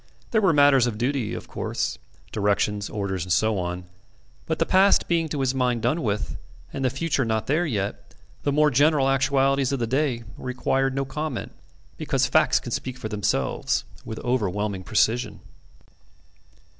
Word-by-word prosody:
There 220 - +3
were 190 -4 +4
matters 140 -4 +5
of 110 -3 -3
duty, 125 -1 -1
of - - -8
course - - -3 0.3
directions, 105 0 0
orders, 95 -4 -3
and 90 - -6
so 110 +2 +2
on; 90 0 -3 0.6
but - - -1
the - - +1
past 195 +2 +4
being 165 -2 +1
to 145 -2 -2
his 130 -1 +1
mind 125 -3 0
done 150 +8 +1
with, 105 -2 -2 0.4
and 135 - -3
the 130 - +3
future 135 +1 -1
not 110 -1 -1
there 160 +5 +1
yet, 100 -7 -4 0.3
the 145 - 0
more 150 +1 +3
general 145 +1 +3
actualities 135 0 +2
of 140 - 0
the 120 - -1
day 130 -1 0 0.2
required 130 +1 -1
no 135 0 -1
comment 150 -1 -4 0.5
because - - 0
facts - - +3
can - - -8
speak 130 -1 -3
for 110 -4 -5
themselves 100 - 0 0.2
with 110 - -6
overwhelming 105 -5 -1
precision. 110 +3 +1
125 Hz, 165 wpm, -24 LUFS, 105-140 Hz, 0.6 s, matters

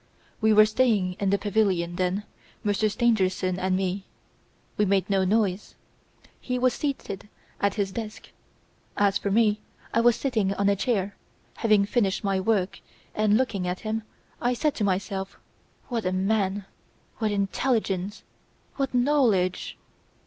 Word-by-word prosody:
"'We 220 0 +4
were 215 0 +8
staying 215 -5 +2
in 200 - +1
the 200 - +3
pavilion, 195 -5 0
then 185 +3 0 0.4
Monsieur 210 +1 +1
Stangerson 190 -5 +1
and 185 0 +1
me. 190 +1 -2 0.7
We 210 - +2
made 195 -1 +2
no 195 -1 +3
noise. 200 0 0 0.6
He 250 -1 -2
was 250 0 +2
seated 210 -9 -4 0.3
at 200 -1 +1
his 200 -2 -1
desk. 215 +1 -7 0.7
As 200 -1 +3
for 200 - -2
me, 210 0 +3 0.3
I 230 - +3
was 240 0 +5
sitting 215 -8 0
on 200 0 +2
a 200 - +3
chair, 200 -2 -1 0.4
having 215 -3 +3
finished 205 -2 0
my 195 -1 +1
work 190 -2 0 0.3
and, 215 0 +3
looking 225 -8 -1
at 180 +1 -3
him, 220 0 -2 0.4
I 245 +1 +1
said 300 +4 +1
to 215 - -1
myself: 195 0 -2 0.5
"What 235 -3 -1
a - - +1
man! 195 +1 0 0.5
what 220 -2 +1
intelligence! 200 -1 -1 0.5
what 270 -2 -1
knowledge!" 245 -9 +2
205 Hz, 145 wpm, -26 LUFS, 190-225 Hz, 0.7 s, were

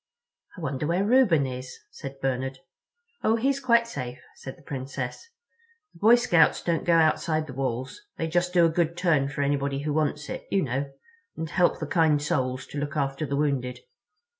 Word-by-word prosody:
"I - - -8
wonder 140 -1 -2
where 180 +4 +1
Reuben 210 - +4
is?" 130 0 -6
said 135 0 -9
Bernard. 130 0 -2 0.7
"Oh, 220 - +3
he's 270 +4 +1
quite 235 -3 +3
safe," 125 - -5 0.2
said 130 - -9
the 170 - -20
Princess. 135 - -5 0.6
"The - - -18
Boy 225 +3 +7
Scouts 175 -10 +3
don't 170 -2 0
go 170 - +4
outside 155 -1 +2
the 135 - -9
walls—they 135 - -4
just 175 +2 0
do 175 -2 +5
a - - +4
good 170 +1 0
turn 155 -7 +2
for 140 0 -2
anybody 140 -1 0
who 150 -1 -1
wants 150 0 -1
it, - - -6
you 195 -2 +2
know—and 150 - -6
help 180 +1 +3
the - - -3
kind 160 -4 +3
Soles 130 -3 -1
to 145 - -4
look 145 +1 -3
after 140 +1 -1
the 140 - -1
wounded." 130 -4 -1
150 Hz, 180 wpm, -26 LUFS, 135-175 Hz, 0.7 s, Boy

